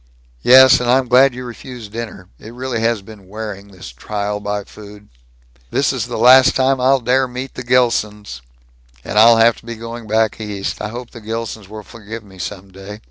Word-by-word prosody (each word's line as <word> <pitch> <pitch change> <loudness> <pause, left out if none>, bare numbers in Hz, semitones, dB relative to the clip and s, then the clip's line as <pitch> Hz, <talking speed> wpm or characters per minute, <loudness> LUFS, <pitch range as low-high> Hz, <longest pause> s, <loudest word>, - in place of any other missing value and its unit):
"Yes, 130 - +7
and 125 -1 -2
I'm 130 +1 +3
glad 125 +1 +4
you 125 0 -7
refused 120 -2 -10
dinner. 110 -5 -7
It 115 +2 -12
really 125 -2 -3
has 115 -2 0
been 100 -2 -14
wearing, 105 -1 -7
this 95 -7 -12
trial 105 - -4
by 105 0 -4
food." 105 0 -14 0.6
"This - - 0
is - - -3
the - - -5
last 130 +3 +6
time 130 0 +1
I'll 135 +1 +3
dare 130 +2 +1
to - - -15
meet 130 +2 -6
the - - -7
Gilsons." 105 - 0 0.6
"And 105 - 0
I'll 115 +1 +7
have 115 +1 +4
to - - -17
be 115 - -5
going 115 0 -8
back 110 0 0
East. 105 -2 -5
I - - -3
hope 120 +3 -8
the 115 - -12
Gilsons 110 -2 -6
will 105 0 -9
forgive 110 +2 -10
me, 95 -2 -17
some 95 +1 -7
day." 95 +2 -10
110 Hz, 200 wpm, -18 LUFS, 105-125 Hz, 0.6 s, Yes